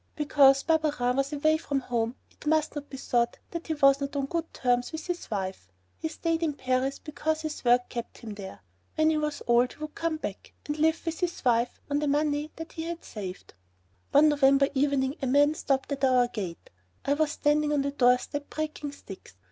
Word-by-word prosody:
Because 275 Hz, -2 st, +5 dB
Barberin 300 Hz, -6 st, +1 dB
was 275 Hz, +1 st, 0 dB
away 310 Hz, +2 st, +2 dB
from 285 Hz, -3 st, -2 dB
home 235 Hz, -1 st, -1 dB, 0.2 s
it -, -, -12 dB
must 310 Hz, 0 st, +2 dB
not 290 Hz, -1 st, -6 dB
be 270 Hz, -, -7 dB
thought 240 Hz, -2 st, 0 dB
that 335 Hz, -1 st, -5 dB
he 320 Hz, -, -1 dB
was 275 Hz, -1 st, +5 dB
not 280 Hz, +1 st, -3 dB
on 280 Hz, -1 st, 0 dB
good 330 Hz, +3 st, -3 dB
terms 245 Hz, -1 st, 0 dB
with 315 Hz, 0 st, -6 dB
his 355 Hz, -1 st, -4 dB
wife. 190 Hz, -, -4 dB, 0.3 s
He -, -, -2 dB
stayed 330 Hz, +1 st, -1 dB
in 315 Hz, -3 st, 0 dB
Paris 255 Hz, 0 st, 0 dB
because 315 Hz, +1 st, -2 dB
his 310 Hz, -1 st, -5 dB
work 245 Hz, 0 st, +4 dB
kept 235 Hz, -1 st, -6 dB
him 220 Hz, -2 st, -8 dB
there. 195 Hz, -2 st, -9 dB, 0.3 s
When 315 Hz, 0 st, +3 dB
he 310 Hz, -, +1 dB
was 300 Hz, -1 st, -3 dB
old 240 Hz, +1 st, +3 dB
he -, -, -20 dB
would 305 Hz, 0 st, -6 dB
come 330 Hz, -1 st, -1 dB
back 205 Hz, -10 st, -7 dB
and 295 Hz, +1 st, -3 dB
live 320 Hz, +2 st, +2 dB
with 330 Hz, -1 st, -3 dB
his 355 Hz, -5 st, -3 dB
wife 240 Hz, 0 st, +2 dB
on 285 Hz, 0 st, 0 dB
the 300 Hz, -, -1 dB
money 295 Hz, +1 st, +1 dB
that 325 Hz, 0 st, -8 dB
he 320 Hz, -, -5 dB
had 340 Hz, 0 st, -5 dB
saved. 190 Hz, -4 st, -8 dB, 0.6 s
One 300 Hz, +2 st, +6 dB
November 275 Hz, -1 st, +4 dB
evening 275 Hz, 0 st, +1 dB
a 270 Hz, -, -1 dB
man 290 Hz, +3 st, +4 dB
stopped 275 Hz, -3 st, -1 dB
at 275 Hz, -1 st, -3 dB
our 255 Hz, -2 st, +4 dB
gate. 185 Hz, -8 st, -6 dB, 0.3 s
I 280 Hz, -, +3 dB
was 305 Hz, +1 st, +1 dB
standing 295 Hz, 0 st, +2 dB
on 290 Hz, -2 st, +2 dB
the 280 Hz, -, -1 dB
doorstep 255 Hz, +2 st, +1 dB
breaking 305 Hz, -2 st, -4 dB
sticks. 195 Hz, -, -12 dB
285 Hz, 210 wpm, -28 LUFS, 250-310 Hz, 0.6 s, One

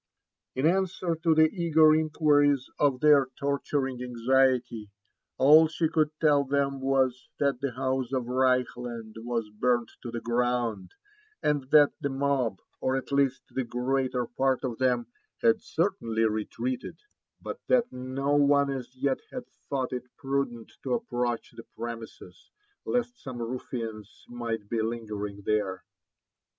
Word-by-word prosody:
In 130 Hz, +3 st, 0 dB
answer 180 Hz, -1 st, +1 dB
to 165 Hz, -1 st, +2 dB
the 160 Hz, 0 st, +6 dB
eager 160 Hz, -3 st, +4 dB
inquiries 145 Hz, -3 st, +3 dB
of 140 Hz, -3 st, +2 dB
their 145 Hz, -3 st, +6 dB
torturing 140 Hz, -2 st, -1 dB
anxiety, 125 Hz, -2 st, +1 dB, 0.5 s
all 155 Hz, +4 st, +7 dB
she 160 Hz, +1 st, 0 dB
could 155 Hz, -2 st, +2 dB
tell 145 Hz, -3 st, +4 dB
them 140 Hz, 0 st, 0 dB
was, 130 Hz, -2 st, +1 dB
that 140 Hz, -3 st, 0 dB
the 140 Hz, -3 st, -2 dB
house 130 Hz, 0 st, -1 dB
of 130 Hz, -2 st, 0 dB
Reichland 125 Hz, -3 st, 0 dB
was 115 Hz, -2 st, -3 dB
burnt 120 Hz, +2 st, 0 dB
to 120 Hz, -, -6 dB
the 120 Hz, 0 st, -4 dB
ground, 120 Hz, -5 st, -1 dB, 0.5 s
and 145 Hz, -2 st, 0 dB
(hat 150 Hz, -2 st, +7 dB
the 140 Hz, -, -1 dB
mob, 135 Hz, -6 st, 0 dB, 0.2 s
or 130 Hz, -, 0 dB
at 135 Hz, -, -4 dB
least 135 Hz, -2 st, +1 dB
the 130 Hz, -, -1 dB
greater 125 Hz, +1 st, -1 dB
part 130 Hz, +2 st, 0 dB
of 120 Hz, -4 st, -3 dB
them, 125 Hz, -2 st, +2 dB, 0.4 s
had 115 Hz, -1 st, +4 dB
Certainly 155 Hz, -, -1 dB
retreated; 115 Hz, +4 st, -3 dB, 0.4 s
bat -, -, -6 dB
that 245 Hz, -1 st, +3 dB
no 130 Hz, +3 st, -2 dB
one 140 Hz, -1 st, +4 dB
as 130 Hz, -1 st, -6 dB
yet 135 Hz, +1 st, 0 dB
had 250 Hz, -2 st, -6 dB, 0.2 s
thought 130 Hz, -2 st, -1 dB
it 125 Hz, 0 st, -5 dB
prudent 135 Hz, -4 st, -2 dB
to -, -, 0 dB
approach 120 Hz, -, -2 dB
the 115 Hz, -, -12 dB
premises, 115 Hz, -5 st, -8 dB, 0.4 s
lest 245 Hz, 0 st, -1 dB
some 130 Hz, -3 st, -7 dB
ruffians 115 Hz, -3 st, -6 dB
might 115 Hz, -3 st, -4 dB
be 115 Hz, +1 st, -1 dB
lingering 105 Hz, -3 st, -4 dB
there. 95 Hz, -4 st, 0 dB
130 Hz, 140 wpm, -28 LUFS, 120-140 Hz, 0.5 s, all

